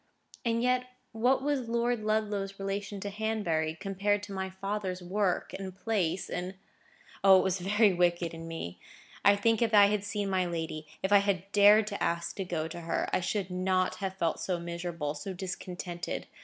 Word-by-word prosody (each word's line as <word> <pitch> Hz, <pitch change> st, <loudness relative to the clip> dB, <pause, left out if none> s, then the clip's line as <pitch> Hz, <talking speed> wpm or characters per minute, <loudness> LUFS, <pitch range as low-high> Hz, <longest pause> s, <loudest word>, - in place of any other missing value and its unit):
And 230 Hz, -1 st, +1 dB
yet 250 Hz, 0 st, +2 dB, 0.3 s
what 250 Hz, +4 st, +2 dB
was 275 Hz, -5 st, -1 dB
Lord 235 Hz, -1 st, 0 dB
Ludlow's 205 Hz, -2 st, -1 dB
relation 195 Hz, +1 st, -3 dB
to 205 Hz, -, -4 dB
Hanbury, 195 Hz, -7 st, -1 dB
compared 200 Hz, +1 st, 0 dB
to 205 Hz, -1 st, -7 dB
my 190 Hz, 0 st, -3 dB
father's 190 Hz, -1 st, -4 dB
work 190 Hz, +1 st, 0 dB
and 190 Hz, -1 st, -7 dB
place 190 Hz, -5 st, -1 dB
in—? 180 Hz, +2 st, -4 dB, 0.7 s
O! 195 Hz, -1 st, +8 dB
it -, -, +3 dB
was 190 Hz, -1 st, 0 dB
very 205 Hz, +2 st, +3 dB
wicked 175 Hz, -1 st, +1 dB
in 165 Hz, 0 st, -7 dB
me! 125 Hz, -, -6 dB, 0.4 s
I 200 Hz, -, +7 dB
think 225 Hz, +2 st, +2 dB
if 225 Hz, -2 st, +3 dB
I 205 Hz, -1 st, +9 dB
had 210 Hz, -1 st, 0 dB
seen 205 Hz, 0 st, -2 dB
my 185 Hz, -2 st, +1 dB
lady,—if 160 Hz, +1 st, -4 dB
I 205 Hz, -, +9 dB
had 200 Hz, -1 st, -1 dB
dared 205 Hz, +1 st, +7 dB
to 205 Hz, -1 st, -5 dB
ask 170 Hz, 0 st, -1 dB
to 195 Hz, -, -1 dB
go 165 Hz, -3 st, -2 dB
to 170 Hz, +1 st, -7 dB
her, 165 Hz, 0 st, -2 dB
I -, -, +3 dB
should 185 Hz, +1 st, -2 dB
not 185 Hz, 0 st, +1 dB
have 190 Hz, -2 st, -3 dB
felt 165 Hz, -3 st, 0 dB
so 180 Hz, -2 st, -1 dB
miserable, 170 Hz, -3 st, -4 dB
so 155 Hz, +6 st, -6 dB
discontented. 180 Hz, -1 st, -5 dB
195 Hz, 180 wpm, -30 LUFS, 175-210 Hz, 0.7 s, I